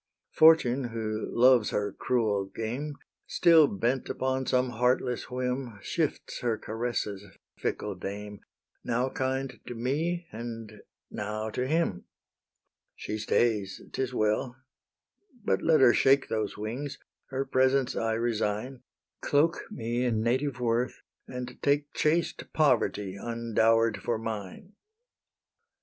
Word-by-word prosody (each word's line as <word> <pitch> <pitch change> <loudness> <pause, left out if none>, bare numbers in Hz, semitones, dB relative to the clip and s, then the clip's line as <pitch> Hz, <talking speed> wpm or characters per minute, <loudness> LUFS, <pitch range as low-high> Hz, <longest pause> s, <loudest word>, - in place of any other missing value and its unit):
Fortune, 140 -5 +5
who 110 -2 -3
loves 125 -2 +5
her 100 -1 -1
cruel 110 -5 0
game, 120 +9 -4 0.3
Still 165 -3 +6
bent 120 +5 -1
upon 130 0 -1
some 125 -1 +2
heartless 125 +1 0
whim, 125 -2 -3
Shifts - - -2
her 115 -2 0
caresses, 110 -3 -3 0.4
fickle 105 - -2
dame, 100 +2 -6 0.4
Now 125 +2 0
kind 130 -1 -2
to 120 - -5
me, 160 +9 -1
and 115 -1 -7 0.3
now 105 +1 -3
to 125 +3 -2
him: 155 - 0 0.9
She 110 - -5
stays; 105 -2 +1
'tis 130 -1 -1
well: 110 +2 0 0.9
but - - +1
let 155 -3 +4
her 120 -2 +7
shake 135 0 +4
Those 110 -2 -2
wings, 125 +7 -4 0.3
her 135 +1 -2
presents 130 0 +2
I 115 0 0
resign, 115 +2 -1 0.4
Cloak 155 +4 +2
me 120 - -2
in 115 -3 +1
native 130 +2 0
worth, 120 +1 -1 0.2
and 125 -1 -7
take 145 0 +1
Chaste 165 +2 0
Poverty 115 -9 +2
undower'd 115 -1 +2
for 115 - -1
mine. 110 - -6
120 Hz, 120 wpm, -28 LUFS, 110-130 Hz, 0.9 s, her